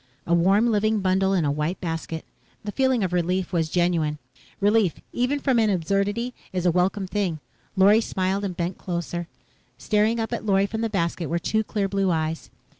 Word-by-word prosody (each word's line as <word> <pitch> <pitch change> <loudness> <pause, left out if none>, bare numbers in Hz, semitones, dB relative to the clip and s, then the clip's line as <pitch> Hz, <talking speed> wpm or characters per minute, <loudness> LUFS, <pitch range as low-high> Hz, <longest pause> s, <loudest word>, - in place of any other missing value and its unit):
A 170 - 0
warm, 190 +6 +4
living 215 0 +2
bundle 190 +1 +2
in 175 -5 +2
a 145 - +1
white 150 +5 -2
basket. 165 -1 -4 0.4
The 210 - -4
feeling 260 -2 +2
of 180 -1 -1
relief 180 +2 0
was 165 -2 +1
genuine. 170 -3 +1 0.4
Relief, 205 -3 +3 0.2
even 250 +4 0
from 265 -4 +2
an 220 -1 +3
absurdity, 200 +6 0 0.2
is 180 -1 -2
a 175 - +5
welcome 190 +3 +1
thing. 185 -4 -2 0.4
Lorry 205 +3 +6
smiled 190 -1 -1
and 185 -3 -4
bent 175 +1 -3
closer. 175 -1 -4 0.5
Staring 215 +2 +1
up 225 - -2
at - - -3
Lorry 195 -2 +3
from 220 +2 -4
the 225 - 0
basket 170 -4 -1
were 170 - 0
two 220 +5 0
clear 205 -2 -1
blue 195 -1 0
eyes. 160 -1 -2
190 Hz, 190 wpm, -24 LUFS, 170-210 Hz, 0.5 s, Lorry